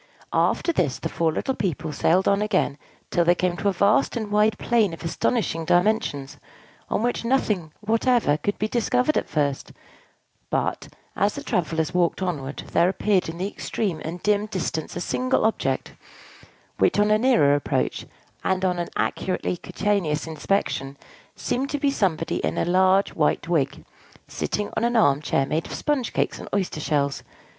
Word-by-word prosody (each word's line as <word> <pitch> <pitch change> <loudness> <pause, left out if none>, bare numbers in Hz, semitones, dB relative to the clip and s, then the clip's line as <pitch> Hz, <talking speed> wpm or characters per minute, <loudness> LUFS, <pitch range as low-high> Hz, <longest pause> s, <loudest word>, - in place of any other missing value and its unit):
After 340 - +2
this, 145 - 0
the - - -4
four 160 0 +1
little 265 - -1
people 170 - -2
sailed 175 +6 +2
on 200 +1 +3
again 180 -8 0 0.3
till 175 - +3
they 175 +1 +4
came 180 0 0
to 205 - -1
a - - +4
vast 200 +9 +2
and 215 -3 -4
wide 210 0 +3
plain 225 -7 +2
of - - -13
astonishing 165 -1 0
dimensions, 175 -6 +1 0.5
on 215 - 0
which 245 0 0
nothing 210 - 0
whatever 225 - +2
could 205 +7 -2
be 215 - 0
discovered 250 +5 +1
at - - -1
first; 145 -3 -1 0.8
but, - - -1 0.3
as 205 +1 +1
the - - -6
travellers 160 -1 -1
walked 175 -1 +1
onward, 145 -6 -3
there 175 - +4
appeared 190 -2 +1
in 165 - -6
the 185 +2 -2
extreme 195 -5 -3
and 170 +2 -6
dim 210 0 +2
distance 175 -6 -3
a 175 - -3
single 255 +4 0
object, 220 - -1 0.9
which - - +3
on 210 +1 +3
a 215 - +4
nearer 225 - +4
approach, 145 - -1 0.4
and 190 0 +1
on 180 -1 0
an 175 - -3
accurately 185 -1 -1
cutaneous 175 -5 -1
inspection, 155 -4 -2 0.4
seemed 270 +3 -2
to 290 - -1
be 285 -1 +1
somebody 180 - 0
in - - -2
a - - +1
large 185 +2 +3
white 155 +1 +1
wig, 160 -6 0 0.4
sitting 210 0 -3
on 220 - 0
an 240 +1 +1
arm 145 -11 +4
chair 135 -2 +1
made 155 +4 -2
of - - -6
sponge 285 -6 -1
cakes - - -1
and - - -8
oyster 190 -6 -1
shells. 140 -2 0
185 Hz, 170 wpm, -24 LUFS, 160-215 Hz, 0.9 s, they